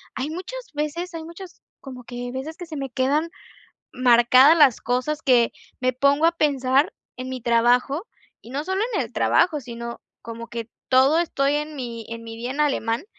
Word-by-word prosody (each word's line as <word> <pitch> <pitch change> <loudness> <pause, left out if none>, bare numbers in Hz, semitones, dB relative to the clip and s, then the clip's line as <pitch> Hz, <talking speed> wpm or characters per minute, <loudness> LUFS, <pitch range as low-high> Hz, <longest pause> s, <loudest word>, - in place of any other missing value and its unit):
hay 270 +4 -3
muchas 375 +10 -6
veces 335 +4 -3
hay 325 -1 -6
muchos 350 +2 -11 0.2
como 255 -3 -10
que 245 0 -6
veces 275 +5 -6
que 350 - -7
se 315 -3 -7
me 270 -1 -4
quedan 280 +7 0 0.6
marcadas 255 +5 +6
las 270 -6 +5
cosas 255 +6 -1
que 245 -3 +4 0.3
me 255 -1 +1
pongo 280 +4 +3
a 335 - +4
pensar 275 -3 +2 0.2
en 255 +1 -6
mi 255 -1 -5
trabajo 245 - +2 0.4
y 235 - -13
no 285 +3 -3
solo 380 +3 -1
en - - +1
el - - -8
trabajo, 320 -5 +2
sino 235 -1 -8 0.2
como 230 0 -8
que 235 -1 -6 0.2
todo 265 +5 +5
estoy 285 -4 +1
en 300 +1 -4
mi 235 -4 -6
en 230 0 -7
mi 225 0 -8
día 240 +2 -5
en 285 +3 -3
alemán 255 -2 0
265 Hz, 185 wpm, -23 LUFS, 245-305 Hz, 0.6 s, marcadas